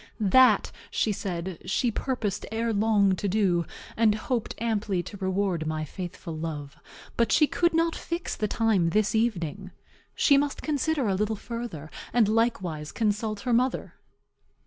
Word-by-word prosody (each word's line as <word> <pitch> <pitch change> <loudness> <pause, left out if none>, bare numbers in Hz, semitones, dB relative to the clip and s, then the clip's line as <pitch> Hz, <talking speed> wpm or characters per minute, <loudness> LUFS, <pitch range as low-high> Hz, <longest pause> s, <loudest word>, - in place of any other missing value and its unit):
That, 220 +1 +5 0.2
she 220 - +1
said, 185 -3 -4
she 235 +5 +1
purposed 215 -5 -2
ere 225 +1 0
long 205 -2 +3
to 200 - -2
do, 185 -4 +1 0.3
and 220 -2 +4
hoped 230 +1 -2
amply 210 -5 -1
to 205 - -9
reward 190 -4 -1
my 155 0 -2
faithful 175 0 -7
love; 155 -3 -5 0.4
but 235 -2 +2
she 305 - +6
could 345 +3 +1
not 330 0 +2
fix 340 +1 -4
the 215 - -1
time 205 -6 +2
this 210 +4 +1
evening. 195 -5 -1 0.5
She 280 - +5
must 285 0 -1
consider 300 -3 0
a 195 - +2
little 210 +3 0
further, 220 -10 -6 0.2
and 230 -3 +4
likewise 190 -9 0
consult 215 -1 -1
her 250 -2 0
mother. 250 +2 +1
210 Hz, 150 wpm, -27 LUFS, 185-235 Hz, 0.5 s, she